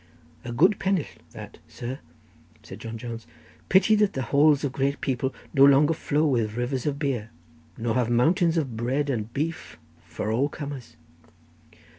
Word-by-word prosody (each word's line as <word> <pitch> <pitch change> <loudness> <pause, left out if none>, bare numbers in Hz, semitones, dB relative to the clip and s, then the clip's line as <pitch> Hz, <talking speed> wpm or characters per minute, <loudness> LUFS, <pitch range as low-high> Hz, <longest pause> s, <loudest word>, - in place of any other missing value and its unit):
'" 80 +6 -27
"A 120 - -5
good 180 - +3
penill 190 -5 0 0.2
that, - - -11
sir," 125 +3 -6 0.6
said - - -10
John 115 0 -6
Jones. 115 -3 -7 0.4
"Pity 195 +4 +5
that 210 -1 +2
the 130 - -2
halls 145 0 +5
of 140 - -1
great 140 +1 -1
people 130 0 -1 0.2
no 135 - +5
longer 140 +3 +6
flow 150 0 0
with 115 -6 0
rivers 125 +2 -2
of 140 -1 -1
beer, 130 -7 -2 0.5
nor 115 0 -1
have 120 -1 +1
mountains 165 +8 +2
of 135 -8 -2
bread 135 +5 -1
and 110 -3 -3
beef 160 +5 -4 0.3
for 110 - -4
all 130 +6 +1
comers." 145 -4 -8
135 Hz, 165 wpm, -25 LUFS, 120-150 Hz, 0.6 s, longer